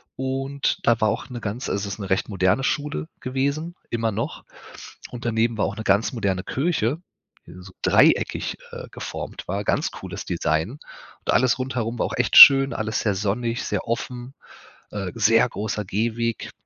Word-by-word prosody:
und 135 +1 -2
da 115 -1 +3
war 110 - +3
auch 120 - -4
'ne 120 -2 -7
ganz 110 +5 -4
also, 100 0 -2
es 100 - -4
ist - - -19
'ne 100 -2 -6
recht 95 - 0
moderne 95 +5 +1
Schule 145 +3 -2
gewesen- 140 +6 -2
immer 115 -1 -1
noch. 100 - -4 0.7
Und 120 -1 -8
daneben 115 0 0
war - - +1
auch 100 - -3
'ne 110 - -5
ganz 100 +4 +2
moderne 100 -6 -1
Kirche, 140 - -1 0.5
die - - -12
so 95 0 -13
dreieckig, - - +3
äh, - - -8
geformt - - -7
war, 100 +3 -2
ganz - - 0
cooles - - -7
Design. 80 +6 -1
Und 145 - -8
alles 125 +1 +3
rundherum 125 -3 -3
war - - +1
auch - - -5
echt - - +2
schön, 135 -2 +10
alles 110 -1 -2
sehr 105 -3 0
sonnig, 115 +4 -2
sehr - - -3
offen, 120 +2 -4 0.6
äh, 100 -3 -4
sehr 115 +3 +4
großer 105 -1 -4
Gehweg. 115 +3 -2
115 Hz, 175 wpm, -23 LUFS, 105-130 Hz, 0.7 s, schön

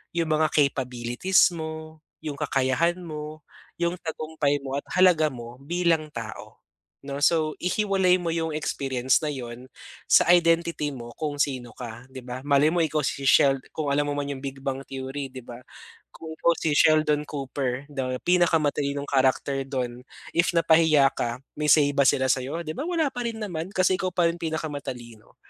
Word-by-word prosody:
yung 165 -2 0
mga 155 0 +3
capabilities 130 +4 +2
mo, 160 -1 -7 0.2
yung 150 -2 -4
kakayahan 150 +4 0
mo, 155 -2 -7 0.4
yung 170 0 0
tagumpay 155 -3 -1
mo 135 0 -4
at - - -13 0.2
halaga 175 -4 +5
mo 120 -1 -9
bilang 165 -1 0
tao, 115 -5 -8 0.5
'no. 140 0 -4
So, 155 -1 +2
ihiwalay 190 -1 +2
mo 170 -2 -2
yung 160 -1 -1
experience 135 -4 0
na 150 - -1
'yon 125 -2 -7 0.4
sa - - +6
identity 170 -3 +2
mo 120 -3 -9
kung 150 -2 -4
sino 130 -4 -1
ka, 120 -1 -8
'di 130 - -8
ba. 125 +1 -7
Malay 145 +1 +4
mo 170 -1 +2
ikaw 155 -1 0
si 140 - -2
Shel 135 +1 +5
kung 150 -3 -2
alam 145 0 +1
mo - - -1
man 140 - -3
yung 135 -1 -7
Big 135 0 -6
Bang 135 0 -3
Theory 135 +1 -5
di 130 - -8
ba. 120 0 -10 0.5
Kung 160 - -10
ikaw 170 - +3
si 160 - -1
Sheldon 155 -1 +4
Cooper 135 -2 -3
the 130 -2 -2
pinakamatalinong 150 -5 +1
character 135 0 +1
dun, 125 -2 -4 0.3
if 170 - +2
napahiya 160 -4 +5
ka 120 +1 -3 0.2
may 150 - -2
say 150 -2 +6
ba 140 -1 +2
sila 130 0 +3
sa'yo? 135 +6 -2
'Di 155 - -3
ba - - -2
wala 330 -4 +1
pa 245 -1 -4
rin 230 -1 -4
naman 175 -4 -4
kasi 185 0 +3
ikaw 185 - -1
pa 175 -2 +3
rin 170 - -4
pinakamatalino. 145 -8 -6
145 Hz, 175 wpm, -25 LUFS, 130-165 Hz, 0.5 s, sa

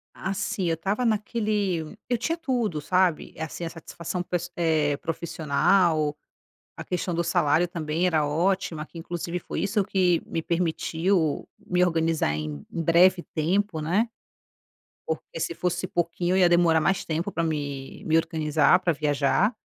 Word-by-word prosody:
Assim, 195 +1 -2
eu 165 - +2
estava 195 +9 -1
naquele 210 -6 -1
eu 245 - +2
tinha 330 +8 -1
tudo, 240 - -1
sabe. 180 0 +1
Assim, 160 +2 -5
a - - -3
satisfação 170 +2 -5
pes 175 0 -3
eh, 155 -4 +1
profissional. 160 0 +1 0.6
A - - -7
questão 180 0 -2
do 170 +1 0
salário 170 -1 +2
também 170 0 -1
era 155 -4 +2
ótima, 170 +1 0
que 170 - -17
inclusive 175 +1 -4
foi - - -4
isso 200 +1 +1
que 180 -4 +2
me 165 - -3
permitiu 170 0 0
me 180 -4 +1
organizar 165 - +1
em 75 -2 -5
em 165 - -3
breve 175 +2 +5
tempo, 175 +2 0
né. 190 +10 +1 1.0
Porque 160 +1 -4
se 170 - -2
fosse 180 +1 -1
pouquinho, 175 +1 -1
eu - - +3
ia 180 - +6
demorar 170 -2 +4
mais 190 +5 +1
tempo 165 +5 -2
pra 170 - -1
me 145 -4 -4
me 160 - +2
organizar 160 +1 +3
pra 170 - +2
viajar, 150 - +1
170 Hz, 150 wpm, -26 LUFS, 160-185 Hz, 1.0 s, ia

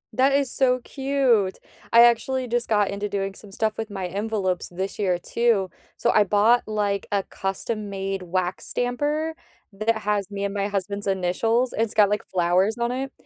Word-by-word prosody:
That 265 +2 +4
is 275 -2 +1
so 255 -1 +2
cute, 265 -8 +1 0.3
I 230 - +8
actually 250 +2 +2
just 240 0 -1
got 210 -3 +2
into 200 +1 -3
doing 195 -1 -2
some 200 +1 -13
stuff 215 +2 -1
with 225 -1 -3
my 190 -2 -4
envelopes 195 -1 -2
this 190 +3 -5
year, 185 -4 +1
too, 200 -1 +1 0.3
so 240 - +2
I 210 - +5
bought, 210 +4 +3
like, 205 -2 -1
a 200 -1 +1
custom-made 195 -1 -4
wax 180 +1 -2
stamper 295 +6 -1 0.4
that 215 +3 0
has 205 -2 0
me 200 -1 -3
and 200 - -3
my 200 0 -1
husband's 200 0 -3
initials, 195 +6 +1
it's 225 -1 -1
got, 210 -2 +5
like, 210 - +1
flowers 185 +4 +2
on 235 0 0
it, 265 +1 -3
210 Hz, 175 wpm, -24 LUFS, 195-235 Hz, 0.4 s, I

